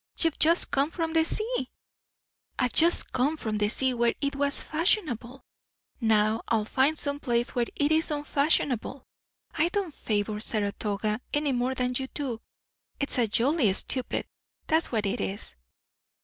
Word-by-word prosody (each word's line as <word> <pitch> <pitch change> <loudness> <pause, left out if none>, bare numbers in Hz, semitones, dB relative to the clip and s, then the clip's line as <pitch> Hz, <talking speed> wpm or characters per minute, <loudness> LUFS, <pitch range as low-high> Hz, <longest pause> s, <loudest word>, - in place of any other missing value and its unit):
"You've 330 -3 +1
just 335 +3 +3
come 280 +2 +2
from 330 -1 -3
the 325 -1 +4
sea." 440 +9 -1 0.9
"I've 250 -2 0
just 335 +2 +3
come 275 +5 +1
from 215 -6 -3
the 210 0 +2
sea 260 +3 +1
where 235 -1 +1
it 280 -1 -1
was 280 0 +1
fashionable. 305 - 0 0.5
Now 220 -1 +2
I'll 220 -2 +1
find 270 +7 +2
some 285 -1 -2
place 240 -3 0
where 240 -1 0
it 290 +1 +1
is 320 +1 +2
unfashionable. 285 -3 0 0.5
I 330 +3 +1
don't 375 -4 -2
favour 210 -2 -2
Saratoga 210 +1 0
any 295 -1 +1
more 255 +1 0
than 250 -1 -1
you 265 +1 -1
do. 255 -6 -3 0.6
It's 280 -2 0
a 235 - +3
jolly 240 - +2
stupid; 255 +5 -2 0.4
that's 320 +1 +1
what 220 -4 0
it 200 +2 -1
is." 195 - -5
260 Hz, 155 wpm, -27 LUFS, 225-305 Hz, 0.9 s, the